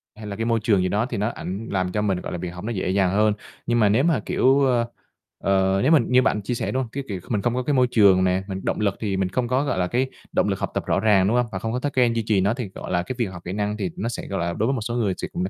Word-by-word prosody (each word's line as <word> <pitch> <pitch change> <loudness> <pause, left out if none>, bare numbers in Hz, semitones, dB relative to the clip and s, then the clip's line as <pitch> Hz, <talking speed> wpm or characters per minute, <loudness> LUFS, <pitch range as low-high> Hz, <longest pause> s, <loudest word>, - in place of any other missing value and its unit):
hay 105 -1 -9
là 100 - -5
cái 115 +2 -2
môi 115 -1 +2
trường 105 -5 +3
gì 90 - +1
đó, 105 +3 +1
thì 125 -3 -4
nó 105 +3 0
ảnh 100 0 -6
làm 95 -2 0
cho 105 - -1
mình, 95 -3 0
gọi - - -6
là, 90 - -3
việc 90 +1 -4
học 90 +1 -9
nó 115 - -3
dễ 95 -4 -2
dàng 95 -1 +2
hơn. 105 +2 +3 0.3
Nhưng 120 0 +2
mà 105 -3 +4
nếu 120 +7 +3
mà, 165 -4 +2
kiểu, 135 +2 +3
ơ, 120 -3 +2 0.6
ờ, 95 0 +2
nếu 140 - +3
mình 150 -8 +5
như 125 0 +5
bạn 105 -5 +1
chia 110 +5 -3
sẻ, - - -2
đúng 130 +1 0
hông, 120 - -8
cái 140 +1 -4
kiểu 100 -4 -4
mình 105 -4 0
không 120 +3 0
có 125 - -1
cái 145 +3 0
môi 125 -2 +4
trường 100 -5 +5
nè, 95 +1 +1
mình 95 -1 -5
động - - -1
lực 100 -2 +1
thì 100 -3 -2
mình 95 -1 0
không 120 +5 -1
có, 130 +3 +1
gọi 130 -9 -1
là, 90 - +1
cái 125 +5 0 0.2
động - - +1
lực - - -1
học - - -3
tập - - -2
rõ - - +1
ràng, 100 -3 +4
đúng 120 +4 +2
hông? 125 - +2
Và 95 - -4
không 115 - -3
có 125 - -1
thói 145 +2 -2
quen 125 -3 +3
duy 115 - 0
trì 105 -3 +2
nó 100 +3 +2
thì, 120 -5 -5
gọi - - -7
là, 85 - +1
cái 130 +7 -5
việc 120 - +2
học 95 -3 -8
kỹ 90 - -4
năng 105 +1 -2
thì 100 -4 -2
nó 115 +4 -2
sẽ, 120 - -6
gọi 100 - -3
là, 85 0 -1
đối 110 +6 0
với 135 - +1
một 120 - -2
số 120 +2 -3
người 105 -6 +1
sẽ - - -4
cũng 90 - -2
là 95 - -2
105 Hz, 355 wpm, -23 LUFS, 95-120 Hz, 0.6 s, mình